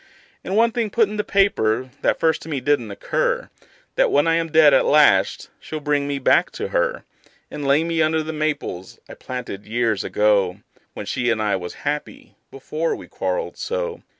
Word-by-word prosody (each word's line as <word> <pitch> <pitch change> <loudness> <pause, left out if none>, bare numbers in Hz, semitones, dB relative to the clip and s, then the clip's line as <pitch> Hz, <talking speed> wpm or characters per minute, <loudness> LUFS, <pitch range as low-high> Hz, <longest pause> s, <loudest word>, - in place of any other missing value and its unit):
And 190 - -3
one 230 +1 +4
thing 230 -2 -1
put 225 +1 +2
in 210 - -5
the 210 - 0
paper, 130 - +1
that - - +1
first 160 -1 +1
to - - -10
me 145 -3 -2
didn't 130 -4 0
occur: 100 - -2 0.5
That - - +4
when 145 +2 +3
I 165 - +3
am 165 -1 0
dead 155 -2 +6
at 135 - +5
last 125 -11 +3
she'll 155 - -6
bring 145 -1 0
me 140 -1 -2
back 135 - +3
to - - -4
her; - - -1 0.5
And 145 -2 -5
lay 140 +3 +4
me 165 -1 0
under 155 0 +1
the 160 +1 -5
maples 150 - -3
I - - -10
planted 120 -6 -7
years 115 -2 0
ago, 100 -2 +1 0.3
When - - -6
she 120 -1 -1
and 115 -2 +1
I 105 -2 +1
was 90 -2 -6
happy 145 +1 -4 0.2
before 155 +4 -3
we - - -11
quarreled - - -3
so. 485 -1 -3
150 Hz, 195 wpm, -21 LUFS, 120-165 Hz, 0.5 s, dead